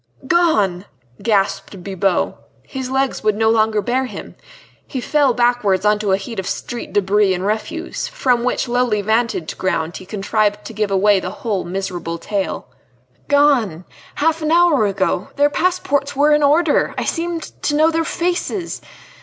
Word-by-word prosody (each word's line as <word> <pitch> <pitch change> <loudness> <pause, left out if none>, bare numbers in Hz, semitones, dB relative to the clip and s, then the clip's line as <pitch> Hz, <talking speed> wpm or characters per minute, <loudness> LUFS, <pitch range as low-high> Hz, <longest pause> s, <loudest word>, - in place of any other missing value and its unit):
"Gone!" 215 - +2 0.4
gasped 200 -3 -1
Bibot. 195 -1 0 0.3
His 260 -2 -6
legs 265 0 -1
would 215 -1 +2
no 220 +1 +2
longer 215 -2 +2
bear 255 +2 0
him. 210 -6 -8 0.5
He 265 - -4
fell 285 +1 +2
backwards 240 -5 +1
on 210 0 +3
to 210 -2 -1
a 190 - +4
heap 200 +2 -6
of 190 - -4
street 240 - -5
debris 200 -1 +2
and 180 +2 -4
refuse, 215 - -3
from 260 - 0
which 255 +1 0
lowly 240 -4 +1
vantage 220 -7 -1
ground 165 -3 -1
he 185 - -12
contrived 210 0 -1
to - - -8
give 210 -1 -1
away 195 +1 +3
the 180 - -4
whole 205 -1 -3
miserable 175 -2 -4
tale. 200 +3 -3 0.6
"Gone! 250 - +2 0.3
half 325 +2 +1
an 310 0 0
hour 335 -10 +4
ago. 195 -1 -1
Their 290 +1 +3
passports 290 -6 0
were 295 +2 +4
in 300 - +3
order!... 300 +2 +3
I - - -1
seemed 335 -1 -3
to 295 - 0
know 315 +2 +4
their 330 0 0
faces! 350 +2 -2
220 Hz, 160 wpm, -19 LUFS, 195-285 Hz, 0.6 s, a